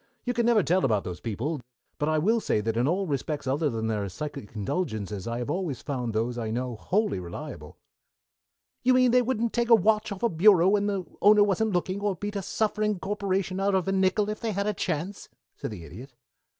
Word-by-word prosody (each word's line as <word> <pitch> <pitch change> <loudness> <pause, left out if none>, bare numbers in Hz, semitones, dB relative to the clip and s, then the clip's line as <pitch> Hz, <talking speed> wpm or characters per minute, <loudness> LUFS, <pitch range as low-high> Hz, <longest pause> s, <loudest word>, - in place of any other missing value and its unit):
"You 245 - -1
never 235 -2 +3
can - - -5
tell 185 +3 +2
about 110 -6 +2
those 90 -1 -6
people, 125 +7 -3 0.4
but 150 - +1
I 155 - +2
will 220 +9 +2
say 160 - 0
that 110 +1 -1
in 120 +3 +2
all 190 +5 +1
respects 150 -1 -3
other 145 +4 +1
than 115 -3 -3
their 105 -3 -1
psychic 140 0 -7
indulgences 105 - -3
I 115 0 -2
have 125 +4 -3
always 170 -7 -3
found 125 -5 -3
those 115 +3 -1
I 110 -2 -3
know 125 +2 -2
wholly 200 - 0
reliable." 85 -1 -8 1.0
"You 255 +1 +4
mean 255 -1 +5
they 250 +1 +5
wouldn't 235 -2 -1
take 235 0 0
a 230 - +9
watch 215 +1 +2
off 200 +1 -6
a 235 - +4
bureau 185 0 +5
when 205 0 +2
the 195 -3 -2 0.2
owner 210 0 +7
wasn't 205 +1 +1
looking, 185 +2 -1
or 205 -2 0
beat 205 +4 -5
a 200 - -1
suffering 210 +1 0
corporation 195 -1 -2
out 195 0 +2
of 190 0 0
a - - +1
nickel 195 +2 +2
if 210 0 -3
they 225 -2 -2
had 200 +1 -1
a 210 - 0
chance?" 185 +2 -3 0.3
said - - -5
the 90 -6 -8
Idiot. 120 - -11
185 Hz, 220 wpm, -27 LUFS, -, 1.0 s, a